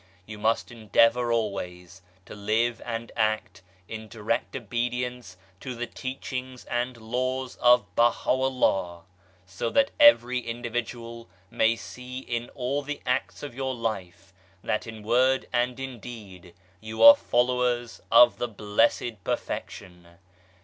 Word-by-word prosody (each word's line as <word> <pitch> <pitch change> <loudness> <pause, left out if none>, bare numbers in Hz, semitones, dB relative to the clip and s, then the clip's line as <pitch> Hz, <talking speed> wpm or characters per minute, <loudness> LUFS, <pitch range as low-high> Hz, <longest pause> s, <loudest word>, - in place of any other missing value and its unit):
You 105 0 -9
must 110 +3 0
endeavour 115 +1 +2
always 95 -5 -3 0.2
to - - -10
live 110 +3 0
and 115 0 -5
act 110 -3 -1 0.3
in 110 0 -7
direct 115 +3 -3
obedience 120 -3 -3 0.2
to 130 +1 -6
the 120 +1 -3
teachings 130 0 -6
and 120 0 -2
laws 130 +3 -3
of 120 -3 +5
Baha'u'llah, 120 -7 +1 0.4
so 95 +5 -3
that 280 0 +2
every 125 - +6
individual 115 -1 -5 0.2
may 115 +1 +3
see 125 +2 -9
in 120 -2 -4
all 135 +2 -1
the 145 +1 -5
acts 125 +3 -1
of 145 -4 -6
your 130 +1 -3
life 95 -5 -5 0.3
that 110 - -2
in 110 -1 -9
word 130 +4 +2
and 125 +1 0
in 130 -3 -6
deed 95 -7 -11 0.2
you 110 +2 -3
are 285 0 +12
followers 125 - 0
of 115 +2 +7
the 120 - -1
Blessed 110 0 0
Perfection. 90 -2 -5
120 Hz, 130 wpm, -26 LUFS, 110-125 Hz, 0.4 s, are